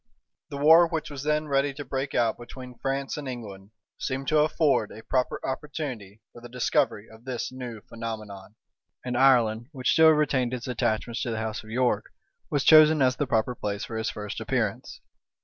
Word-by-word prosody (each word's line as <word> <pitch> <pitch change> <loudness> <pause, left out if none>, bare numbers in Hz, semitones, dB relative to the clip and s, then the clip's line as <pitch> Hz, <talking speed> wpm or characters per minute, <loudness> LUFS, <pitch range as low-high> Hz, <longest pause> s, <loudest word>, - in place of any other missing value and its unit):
The 140 - -6
war, 160 +4 +7
which 160 -2 -4
was 140 -2 -6
then 150 +1 0
ready 140 0 +1
to 145 0 -7
break 135 +2 -3
out 115 -2 +2
between 125 0 -11
France 135 +1 -2
and 145 -2 -6
England, 100 -6 -8 0.3
seemed 135 +1 -3
to 155 - +4
afford 150 -7 +2
a 110 - -11
proper 130 -1 -1
opportunity 130 -7 -5
for 120 - -13
the 120 - -10
discovery 115 -3 0
of 110 +1 -16
this 130 -2 -4
new 125 -4 -7
phenomenon; 110 -3 -8 0.5
and 125 -1 -2
Ireland, 120 -3 +3
which 130 -3 0
still 160 0 +6
retained 135 -5 +2
its 120 - -7
attachments 120 -1 -1
to - - -2
the 115 - -2
house 110 -1 -4
of 110 - -14
York, 120 -3 +1 0.4
was 145 -2 0
chosen 155 0 +7
as 130 0 +2
the 145 - -1
proper 110 +1 +1
place 105 -3 -4
for 115 - -7
his 110 0 -1
first 105 -2 -6
appearance. - - -2
125 Hz, 185 wpm, -26 LUFS, 110-140 Hz, 0.5 s, war